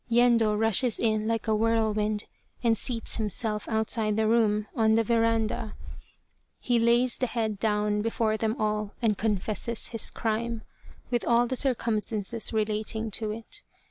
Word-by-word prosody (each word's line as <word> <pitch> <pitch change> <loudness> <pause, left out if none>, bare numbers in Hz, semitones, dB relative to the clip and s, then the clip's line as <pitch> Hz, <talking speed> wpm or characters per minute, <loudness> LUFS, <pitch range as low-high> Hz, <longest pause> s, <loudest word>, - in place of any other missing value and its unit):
Yendo 230 -3 +3
rushes 225 +2 +3
in 215 -1 +1
like 225 0 -1
a 220 - +2
whirlwind 215 -1 +1 0.4
and 230 -1 +4
seats 230 0 -3
himself 210 0 -1
outside 220 -1 +1
the 220 - +2
room, 215 -2 +2
on 220 -1 +3
the 225 - +3
veranda. 225 -1 0 0.8
He 240 -1 +1
lays 235 +2 +2
the 255 - +1
head 220 -4 -2
down 210 -1 +1
before 225 0 0
them 220 +3 -1
all 210 -1 -1
and 220 -3 +2
confesses 215 +2 -2
his 230 -2 -1
crime, 230 0 -2 0.5
with 240 - 0
all 235 0 +3
the 260 - -2
circumstances 230 -3 -1
relating 220 0 -1
to 215 +1 0
it. 220 +1 -5
220 Hz, 145 wpm, -27 LUFS, 215-230 Hz, 0.8 s, and